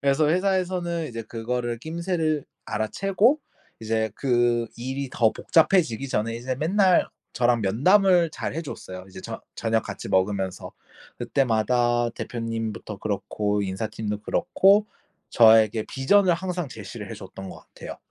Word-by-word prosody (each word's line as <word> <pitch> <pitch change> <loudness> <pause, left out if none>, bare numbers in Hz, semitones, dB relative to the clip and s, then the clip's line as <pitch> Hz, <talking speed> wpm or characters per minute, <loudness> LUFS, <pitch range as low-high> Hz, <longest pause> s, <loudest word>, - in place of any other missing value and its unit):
그래서 140 +2 +3
회사에서는 180 -2 0
이제 115 -1 -6
그거를 120 +1 -3
낌새를 160 -1 -2 0.2
알아채고 195 - +1 0.4
이제 110 0 -1
그 120 -3 +1
일이 130 +3 -4
더 115 -2 +3
복잡해지기 160 - +2
전에 115 -1 -1
이제 125 +2 -3
맨날 185 +4 +3 0.2
저랑 120 -1 +2
면담을 175 - +4
잘 - - -4
해줬어요. 95 - -7
이제 95 - -10
저 - - -7
저녁 115 -1 0
같이 - - -7
먹으면서 95 0 -1 0.5
그때마다 120 -1 +1
대표님부터 115 -3 -5
그렇고 105 0 -2
인사팀도 105 +2 -4
그렇고 200 - +3 0.4
저에게 110 -1 +5
vision을 180 +7 +3
항상 180 -2 -4
제시를 - - -8
해줬던 95 0 -9
거 - - -9
같아요. - - -10
120 Hz, 330 characters per minute, -25 LUFS, 110-170 Hz, 0.5 s, 저에게